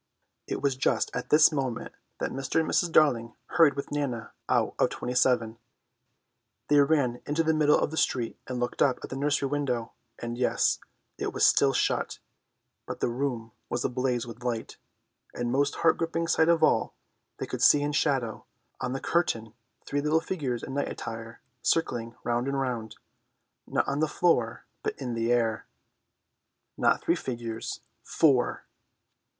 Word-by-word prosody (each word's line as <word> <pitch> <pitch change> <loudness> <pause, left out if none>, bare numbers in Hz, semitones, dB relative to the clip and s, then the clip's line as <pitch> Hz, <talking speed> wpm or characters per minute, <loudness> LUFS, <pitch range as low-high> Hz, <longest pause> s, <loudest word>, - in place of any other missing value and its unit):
It - - -4
was 140 -2 +2
just 130 - 0
at 125 - -4
this 155 +2 +7
moment 130 -6 -3 0.2
that - - -2
Mr. 135 +3 -1
and 160 - 0
Mrs. 175 - +1
Darling 120 -8 +3
hurried 165 -5 +5
with 140 - -5
Nana 140 -6 -3 0.2
out - - +2
of - - +4
27. 120 -2 0 1.1
They 145 0 +6
ran 140 -4 +2
into 150 +3 +1
the 160 0 +2
middle 150 -1 +4
of - - 0
the 160 - -5
street 120 -6 0
to 130 - -4
look 120 0 -2
up 130 -3 +4
at - - -7
the - - -3
nursery 140 0 +1
window; 130 -5 -1 0.3
and, 120 0 -5
yes, 125 - +2 0.4
it - - -2
was - - +3
still - - +5
shut, - - 0 0.7
but - - -5
the - - +1
room 120 -2 -3 0.2
was 120 - -1
ablaze 125 -1 0
with 120 0 -10
light, 120 -2 -3 0.6
and 120 0 -2
most 140 +2 +1
heart 160 - +3
gripping 165 0 -1
sight 160 0 +3
of 170 -1 +3
all, - - +2 0.4
they - - -3
could - - -5
see 145 -1 +6
in 145 - 0
shadow 135 -7 0 0.3
on 125 - -2
the 135 - -2
curtain 115 -10 0 0.3
three 145 0 -1
little 150 +2 +2
figures 140 -9 -3
in 135 - -6
night 140 - -1
attire 115 0 -7 0.2
circling 120 -8 0
round 120 +2 0
and 140 0 -1
round, 115 -5 -3 0.7
not - - 0
on 140 - -1
the 155 - +2
floor 125 -9 +1 0.2
but - - -3
in 125 -3 -3
the 115 +1 0
air. 115 -2 +1 1.1
Not - - +2
three - - +3
figures, 115 -3 -5 0.2
four! 135 -6 +2
130 Hz, 165 wpm, -28 LUFS, 120-145 Hz, 1.1 s, this